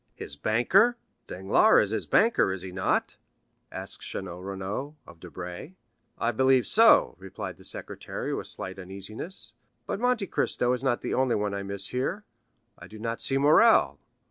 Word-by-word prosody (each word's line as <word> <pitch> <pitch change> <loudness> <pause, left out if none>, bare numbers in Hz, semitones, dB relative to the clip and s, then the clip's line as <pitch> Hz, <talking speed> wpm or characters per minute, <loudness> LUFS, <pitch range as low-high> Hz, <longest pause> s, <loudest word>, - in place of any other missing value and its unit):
"His 70 - -8
banker? 150 - +3 0.3
Danglars 95 +2 +3
is - - -7
his 110 - -2
banker, 225 - +3
is 95 -1 -5
he 95 - -7
not?" 95 0 -1 0.5
asked - - -8
Château 90 -1 -6
Renaud 100 +9 -5
of 85 - -15
Debray. 90 - -8 0.4
"I 115 - 0
believe 130 +1 +3
so," 230 +1 +5
replied 95 0 -7
the - - -16
secretary - - -5
with - - -3
slight 95 +1 -6
uneasiness. 110 - -7 0.3
"But 195 - -3
Monte 245 -3 +1
Cristo 125 -7 0
is 125 +1 -3
not 125 -3 0
the - - -3
only 130 -2 +2
one 105 -1 -1
I 100 - -3
miss 100 0 -3
here; 160 +12 -3 0.5
I - - -11
do 110 - -12
not 115 +1 -4
see 135 - 0
Morrel." 155 +12 +5
110 Hz, 165 wpm, -27 LUFS, 95-140 Hz, 0.5 s, so